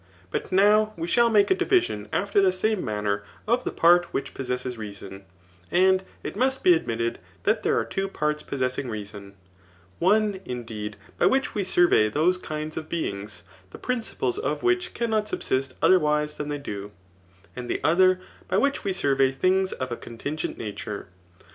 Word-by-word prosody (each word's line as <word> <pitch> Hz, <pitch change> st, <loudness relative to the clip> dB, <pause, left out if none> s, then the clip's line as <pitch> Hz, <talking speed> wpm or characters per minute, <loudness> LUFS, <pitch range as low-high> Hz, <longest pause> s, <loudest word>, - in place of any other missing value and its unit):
But -, -, -3 dB
now 210 Hz, +3 st, +4 dB
we 165 Hz, 0 st, -3 dB
shall 235 Hz, +6 st, +4 dB
make 210 Hz, -, +4 dB
a -, -, +8 dB
division 370 Hz, -1 st, +1 dB
after 405 Hz, -, +2 dB
the 385 Hz, -1 st, +4 dB
same 215 Hz, -, 0 dB
manner 105 Hz, -1 st, -1 dB, 0.3 s
of 240 Hz, +3 st, +2 dB
the -, -, -2 dB
part 175 Hz, +1 st, +5 dB
which 140 Hz, -5 st, -4 dB
pos 135 Hz, -, -6 dB
sesses 125 Hz, 0 st, -2 dB
reason; 100 Hz, -3 st, -8 dB, 0.4 s
and 185 Hz, +1 st, +4 dB, 0.2 s
it -, -, -5 dB
must 265 Hz, +1 st, 0 dB
be 180 Hz, -, +7 dB
admitted 115 Hz, -7 st, -1 dB, 0.2 s
that -, -, +2 dB
there -, -, +1 dB
are -, -, +1 dB
two 195 Hz, 0 st, -2 dB
parts 150 Hz, -5 st, -1 dB
possessing 130 Hz, -1 st, -2 dB
reason; 100 Hz, -2 st, -7 dB, 0.6 s
one, 205 Hz, +2 st, +3 dB
indeed,^ 110 Hz, -, -5 dB, 0.2 s
by -, -, +5 dB
which 270 Hz, 0 st, +1 dB
we 205 Hz, -, -1 dB
sur 180 Hz, -1 st, +4 dB
vey 110 Hz, -10 st, +4 dB
those 170 Hz, +10 st, +2 dB
kind 155 Hz, -2 st, -5 dB
of 155 Hz, 0 st, -5 dB
bemgs, 105 Hz, -11 st, -4 dB, 0.3 s
the -, -, -11 dB
principles 250 Hz, -, -2 dB
of 435 Hz, -, -2 dB
which 360 Hz, 0 st, +1 dB
cannot 220 Hz, -2 st, 0 dB
subsist 130 Hz, 0 st, -1 dB
otherwise 150 Hz, -4 st, +3 dB
than 150 Hz, -, -4 dB
they 145 Hz, -, -2 dB
do, 105 Hz, -8 st, -6 dB, 0.7 s
and 125 Hz, -1 st, -6 dB
the -, -, -1 dB
other, 185 Hz, +3 st, +4 dB, 0.3 s
by 185 Hz, -, +1 dB
which 280 Hz, +5 st, +1 dB
we 195 Hz, -, 0 dB
survey 135 Hz, -5 st, +2 dB
things 185 Hz, +7 st, +1 dB
of 130 Hz, -1 st, -4 dB
a -, -, -1 dB
contingent 145 Hz, +7 st, -5 dB
nature. 105 Hz, -2 st, -6 dB
155 Hz, 175 wpm, -25 LUFS, 125-205 Hz, 0.7 s, a